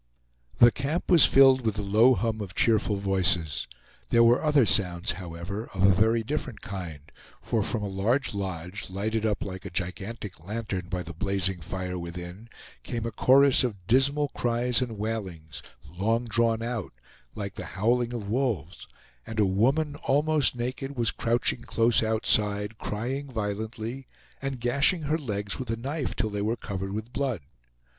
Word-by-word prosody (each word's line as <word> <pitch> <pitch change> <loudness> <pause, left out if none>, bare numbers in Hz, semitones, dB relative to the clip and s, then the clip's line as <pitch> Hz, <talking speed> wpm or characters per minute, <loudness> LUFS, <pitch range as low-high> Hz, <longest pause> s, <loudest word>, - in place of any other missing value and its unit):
The 120 0 +7
camp 145 +9 -3
was 170 -5 +8
filled 135 -1 +6
with 110 -3 0
the 105 - -3
low 110 +6 +5
hum 115 -2 -2
of 95 -4 -7
cheerful 110 -2 +2
voices. 95 -6 +2 0.4
There 115 0 +5
were 120 +4 +4
other 150 -5 +4
sounds, 95 -2 +2
however, 90 +4 -6
of 95 - 0
a 95 0 +6
very 110 +4 +2
different 135 -1 -4
kind, 90 -7 -7 0.4
for - - -1
from 105 - -1
a - - -2
large 110 +8 0
lodge, 95 -1 -5
lighted 110 +3 -1
up 105 -2 -1
like 95 -1 -7
a 100 - -6
gigantic 95 +1 -5
lantern 100 -2 -4
by 90 -1 -3
the 85 +1 -8
blazing 95 0 0
fire 90 +2 -4
within, 90 +5 -8 0.3
came 115 - -4
a 115 - -3
chorus 135 +5 +5
of 100 -8 -4
dismal 140 +6 +3
cries 120 0 +1
and 120 -4 -3
wailings, 95 -8 -5 0.3
long 110 - -1
drawn 115 0 +1
out, 115 - -4 0.4
like 100 -2 -5
the - - -7
howling 120 +4 +1
of 115 -4 -5
wolves, 105 - -2 0.4
and 110 0 -4
a 105 - +5
woman, 135 +11 +1
almost 150 -1 +2
naked, 130 +3 -4
was 115 -2 +2
crouching 120 +1 0
close 115 -1 +2
outside, 105 -1 +1
crying 130 +7 -3
violently, 110 +3 -4 0.3
and 135 -2 -4
gashing 140 +8 +2
her 150 +2 0
legs 105 -7 -3
with 130 -3 -5
a 115 - -1
knife 140 +5 -3
till 110 - -1
they 100 0 -3
were 110 +3 -1
covered 95 -1 -5
with 110 +4 -6
blood. 130 - -1
110 Hz, 165 wpm, -27 LUFS, 95-125 Hz, 0.4 s, was